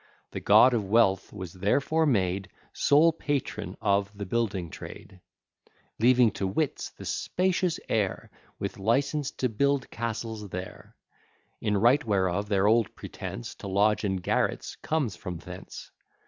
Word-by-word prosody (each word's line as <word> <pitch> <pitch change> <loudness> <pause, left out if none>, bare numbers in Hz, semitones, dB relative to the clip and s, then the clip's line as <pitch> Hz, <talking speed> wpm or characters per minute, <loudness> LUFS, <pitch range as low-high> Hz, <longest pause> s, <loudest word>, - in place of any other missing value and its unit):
The - - -4
God 125 0 +6
of 115 -3 +1
Wealth 95 -4 +3
was 95 -5 -7
therefore 140 - +1
made 95 -6 0 0.2
Sole 155 +3 +4
patron 145 -4 -3
of 100 0 +1
the 100 - -4
building 95 -5 -1
trade; 95 -1 -10 0.8
Leaving 120 0 +5
to 95 - -2
wits 145 +9 -1
the - - -12
spacious 180 -2 0
air, 105 -4 -1 0.3
With - - -5
license 135 +7 +1
to 130 - 0
build 140 +4 0
castles 110 -2 -4
there: 90 +1 -8 0.7
In 105 -2 +1
right 120 +8 +4
whereof 100 -1 0
their 100 -1 +2
old 110 0 +3
pretence - - -7
To - - -8
lodge 105 +3 +2
in 95 -2 0
garrets 90 - -1
comes 145 -9 -1
from 90 -3 -6
thence. - - -10
110 Hz, 140 wpm, -27 LUFS, 95-130 Hz, 0.8 s, God